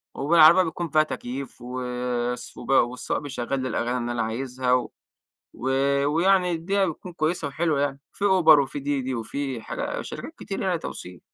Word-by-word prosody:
وبالعربية 165 +4 +6
بيكون 170 0 -4
فيها 155 +1 +4
تكييف 135 -2 -6
وس 125 -1 -3
والسواق 125 -2 +1
بيشغل 135 -2 -3
لي 130 - -2
الأغاني 120 +1 -1
اللي 120 0 -3
أنا 120 -1 -1
عايزها 125 +3 -1
و 125 -1 +1 0.6
و 130 - -4 0.4
ويعني 180 +4 +3
الدنيا 190 +4 0
بتكون 180 +2 -6
كويسة 160 -2 -1
وحلوة 155 0 0
يعني، 140 -1 -1
في 200 - -5
Uber 180 -6 +6
وفي 140 +1 -1
DiDi 135 -2 -2
وفي 130 +2 -4
حاجا - - -4
شركات - - -7
كتيرة - - -4
يعني - - +1
توصيل. 90 -1 -8
140 Hz, 160 wpm, -25 LUFS, 125-160 Hz, 0.6 s, وبالعربية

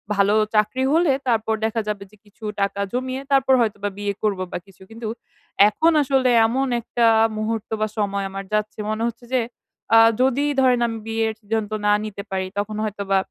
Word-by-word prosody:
ভালো 200 +1 +3 0.2
চাকরি 215 +5 +2
হলে 330 -3 +4 0.2
তারপর 225 -2 +1
দেখা 225 0 -1
যাবে 205 -2 -3
যে 210 - -20
কিছু 210 +2 -22 0.2
টাকা 200 0 -1
জমিয়ে 255 +1 -2
তারপর 265 -1 +4
হয়তোবা 205 -2 -1
বিয়ে 205 0 -2
করব 200 -3 0
বা - - -2
কিছু। 195 -1 -21
কিন্তু 225 0 -7 0.6
এখন 320 +10 +2
আসলে 265 -2 +2 0.2
এমন 265 +4 0
একটা 235 0 0 0.3
মুহূর্ত 220 0 -3
বা 215 - +2
সময় 200 -1 -1
আমার 195 0 -6
যাচ্ছে 215 0 -1
মনে 215 +1 -2
হচ্ছে 235 +1 -7
যে, 255 - +3 0.5
আ - - +9 0.2
যদি 265 +2 +2 0.2
ধরেন 250 -2 +4
আমি 225 -1 -4
বিয়ের 225 0 0
সিদ্ধান্ত 220 0 -3
না 205 - +4
নিতে 200 -1 -6
পারি 190 -1 -2
তখন 205 +1 -2
হয়তোবা 200 -2 -1
220 Hz, 180 wpm, -22 LUFS, 205-245 Hz, 0.6 s, আ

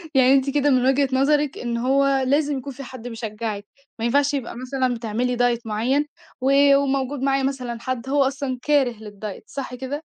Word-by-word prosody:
يعني 260 0 +6
أنتِ 275 0 +3
كده 290 +1 +2
من 255 -2 +3
وجهة 270 +1 +3
نظرِك 290 +2 +2
إن 235 -1 -3
هو 270 +2 +2
لازم 290 +1 +1
يكون 265 +1 -6
في 275 +2 -9
حد 250 -2 -9
بيشجّعِك 220 -3 -5 0.3
ما 225 - -1
ينفعش 280 +4 +2
يبقى 265 -5 -3
مثلًا 255 0 -1
بتعملي 235 +2 -2
diet 245 -1 +2
معيّن 240 +7 0 0.4
و 275 +1 +5
وموجود 275 -1 0
معايا 275 0 +1
مثلًا 255 -3 -2
حد 255 0 -4
هو 285 0 +3
أصلًا 265 -1 -2
كاره 285 -3 +2
للdiet، 210 -2 -8
صح 265 -2 -6
كده؟ 265 +4 -5
260 Hz, 185 wpm, -23 LUFS, 240-275 Hz, 0.4 s, يعني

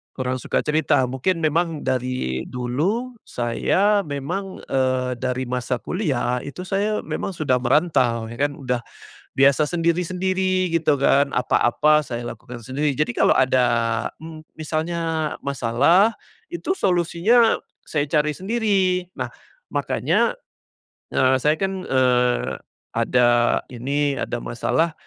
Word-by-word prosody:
kurang 130 -1 -2
suka - - -1
cerita. 150 -3 +2
Mungkin 165 +7 -1
memang 160 0 0
dari 125 - -2
dulu 180 - -2
saya 185 - +1
memang, 175 +8 -4
eee, 130 -1 0
dari 130 0 -2
masa 125 0 -3
kuliah 135 - -1
itu 145 +8 -7
saya 205 +3 -1
memang 195 - -4
sudah 145 -6 +1
merantau, 125 -5 +1
ya 115 - -9
kan, 145 0 0
udah, 125 -3 -2 0.5
biasa 140 +2 +4
sendiri-sendiri 180 +3 0
gitu 160 -4 +1
kan, 140 0 +3
apa-apa 150 +5 +3
saya 120 -2 -5
lakukan 120 +2 -9
sendiri. 140 +5 -1
Jadi 135 -2 -1
kalau - - +4
ada, 130 -1 +3 0.6
mmm, 160 -1 -10
misalnya 160 0 -2
masalah, 140 - +3 0.4
itu 365 +2 -2
solusinya 195 - +3 0.3
saya 145 -2 0
cari 150 0 0
sendiri. 190 -4 0
Nah, - - -4 0.4
makanya, - - +1 0.7
eee, 130 0 +2
saya 150 +3 +2
kan, 190 +1 -2
eee, 125 -1 +2 0.3
ada 120 -1 +3
ini 140 +3 -1
ada - - -2
masalah, 155 - -1
145 Hz, 120 wpm, -22 LUFS, 125-175 Hz, 0.7 s, biasa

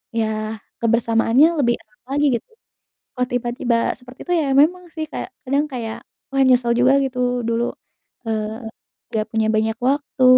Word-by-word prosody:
ya 220 0 -1 0.2
kebersamaannya 230 +4 +4
lebih 240 -1 +3
erat 215 0 -32
lagi 290 +1 +2
gitu, - - -16 0.7
kalau 250 -1 0
tiba-tiba 240 -1 0 0.2
seperti 250 0 -15
itu 355 - -1
ya - - -1 0.2
memang 360 +3 +1
sih 315 - -2
kayak - - -5
kadang 280 +3 +1
kayak, 230 -3 -4 0.3
wah, 270 0 +3
nyesel 245 -2 +4
juga 255 +2 +5
gitu 260 -1 -4 0.3
dulu, 230 +1 +1 0.6
eee, 220 +1 -3 0.5
nggak 215 -1 0
punya 220 -1 +1
banyak 220 +1 +1
waktu 280 -1 0
240 Hz, 150 wpm, -21 LUFS, 225-265 Hz, 0.7 s, juga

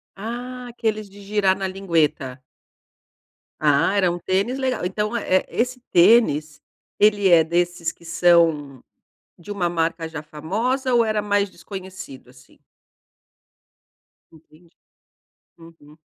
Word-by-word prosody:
Ah, 245 +4 -6
aqueles 220 -3 -3
de 200 +1 -15
girar 200 -1 +1
na 195 - -2
lingueta. 155 -8 -1 1.2
Ah, 150 +6 +2
era 185 -3 +3
um 175 - -5
tênis 195 +8 -1
legal, 260 -7 -2
então 210 +5 -2
eh 195 -5 +2
eh, - - -10
esse 250 +1 -2
tênis, 170 -6 +4 0.4
ele 205 -2 +4
é 170 -2 +6
desses 175 +1 -1
que 170 - -20
são 165 -5 +2 0.6
de 175 +3 -12
uma 190 -4 -1
marca 165 -1 -2
já 160 -2 -7
famosa 225 - -2
ou 235 -1 +4
era 215 -1 0
mais 205 -1 0
desconhecido, 185 -7 -10
assim? 130 0 -21 1.7
Entendi. 160 +1 -21 0.9
Uhum. 165 -3 -17
185 Hz, 125 wpm, -22 LUFS, 165-210 Hz, 1.7 s, é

